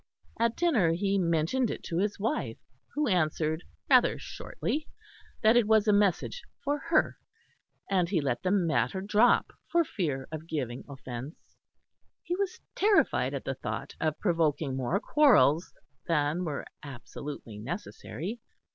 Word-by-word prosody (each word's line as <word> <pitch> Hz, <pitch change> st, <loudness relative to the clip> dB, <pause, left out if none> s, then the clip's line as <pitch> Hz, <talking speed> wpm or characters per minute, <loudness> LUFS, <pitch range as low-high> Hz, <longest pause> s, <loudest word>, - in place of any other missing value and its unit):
At 230 Hz, 0 st, +2 dB
dinner 235 Hz, -, +3 dB
he 195 Hz, +3 st, +1 dB
mentioned 170 Hz, +9 st, +1 dB
it -, -, -5 dB
to 170 Hz, -1 st, -2 dB
his 205 Hz, +1 st, 0 dB
wife, 225 Hz, +9 st, -1 dB, 0.4 s
who 300 Hz, 0 st, +1 dB
answered 160 Hz, -4 st, +1 dB, 0.3 s
rather -, -, +5 dB
shortly 305 Hz, +1 st, -4 dB, 0.6 s
that 220 Hz, +2 st, +6 dB
it 240 Hz, -3 st, +4 dB
was 220 Hz, -1 st, +4 dB
a 210 Hz, -, +5 dB
message 205 Hz, -, +1 dB, 0.2 s
for 290 Hz, +1 st, 0 dB
her; 315 Hz, -2 st, +3 dB, 0.7 s
and 180 Hz, -3 st, +1 dB
he 185 Hz, -4 st, +2 dB
let 130 Hz, -5 st, -1 dB
the 185 Hz, -, 0 dB
matter 185 Hz, 0 st, +1 dB
drop 210 Hz, +4 st, +3 dB, 0.2 s
for 340 Hz, 0 st, +4 dB
fear 145 Hz, -, -3 dB
of 160 Hz, 0 st, -6 dB
giving 130 Hz, -6 st, -3 dB
offence; 135 Hz, +1 st, -9 dB, 0.7 s
he 350 Hz, -, -2 dB
was 390 Hz, -1 st, -3 dB
terrified 410 Hz, 0 st, +3 dB
at -, -, -4 dB
the -, -, -1 dB
thought -, -, -5 dB
of 155 Hz, -1 st, 0 dB
provoking 160 Hz, -6 st, +1 dB
more 135 Hz, +9 st, 0 dB
quarrels 205 Hz, -, +4 dB, 0.4 s
than 160 Hz, +2 st, +1 dB
were 150 Hz, -3 st, -3 dB, 0.2 s
absolutely 135 Hz, -4 st, -8 dB
necessary. 175 Hz, -, -6 dB
180 Hz, 140 wpm, -29 LUFS, 150-220 Hz, 0.7 s, that